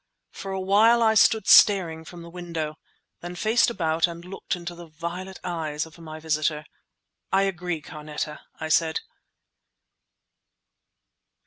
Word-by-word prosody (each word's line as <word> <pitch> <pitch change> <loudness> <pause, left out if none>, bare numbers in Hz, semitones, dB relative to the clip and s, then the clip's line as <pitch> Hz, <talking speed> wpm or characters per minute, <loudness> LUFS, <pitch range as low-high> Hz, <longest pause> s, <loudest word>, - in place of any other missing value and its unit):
For 195 - -7
a 190 - -2
while 215 +5 +4
I 220 -1 +4
stood 220 0 +4
staring 170 -6 +6
from 175 0 -10
the 170 - -10
window, 165 -3 -5 0.4
then 175 +1 -7
faced 220 +7 +3
about 165 -6 +1
and 170 0 -9
looked 185 -1 -4
into 175 0 -7
the 170 0 -11
violet 175 +4 -6
eyes 160 -3 -3
of 160 +1 -16
my 155 -1 -9
visitor. 155 -1 -1 0.7
"I 195 +1 +4
agree, 180 -4 -2
Carneta!" 150 0 -6 0.2
I 160 - -4
said. 160 0 +2
170 Hz, 135 wpm, -25 LUFS, 160-190 Hz, 0.7 s, staring